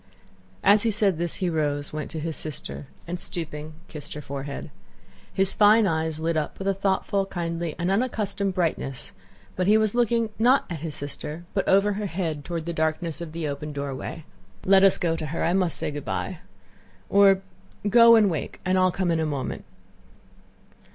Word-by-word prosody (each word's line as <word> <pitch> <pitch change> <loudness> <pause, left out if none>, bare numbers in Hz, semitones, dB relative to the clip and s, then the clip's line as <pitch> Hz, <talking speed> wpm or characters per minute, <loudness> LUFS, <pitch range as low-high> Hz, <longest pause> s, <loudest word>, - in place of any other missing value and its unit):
As 205 +1 +7
he 230 - +2
said 200 -5 +2
this 170 -1 -1
he 185 - -1
rose, 145 -2 -1
went 155 -1 -4
to 160 - -5
his 160 0 -3
sister, 150 -2 -5 0.2
and, 175 +1 -4
stooping, 160 -4 -6
kissed 150 -2 -8
her 150 - -5
forehead. 140 +1 -6 0.6
His 195 0 +3
fine 215 +1 +6
eyes 160 -3 -1
lit 165 +1 0
up 155 -1 -2
with 195 - -4
a 195 - +3
thoughtful, 195 0 0
kindly, 170 -3 -3
and 175 +2 0
unaccustomed 200 -3 -1
brightness, 160 -7 -1 0.4
but 185 0 0
he 215 +1 +6
was 215 -2 +2
looking 235 -2 +1
not 250 +4 +4
at 165 - -4
his 155 -1 -5
sister 150 +3 -6
but 195 - -1
over 200 +2 +4
her 205 +1 -3
head 165 -5 -3
toward 165 -1 -4
the 170 - -3
darkness 160 +1 -1
of 165 -2 -6
the 165 -1 -3
open 145 +1 -5
doorway. 140 +2 -5 0.4
"Let 195 0 +6
us 195 - +6
go 165 -2 0
to 155 -1 -4
her, 160 +2 -3
I 170 - +2
must 185 -3 +1
say - - -3
good 145 -1 -6
by. - - -3 0.7
Or—go 200 +3 +4
and 215 -2 +5
wake 160 -6 -3
and 185 +1 +2
I'll 185 0 +4
come 180 -1 -1
in 165 - +1
a 160 - 0
moment. 140 -3 -4
170 Hz, 185 wpm, -25 LUFS, 155-195 Hz, 0.7 s, As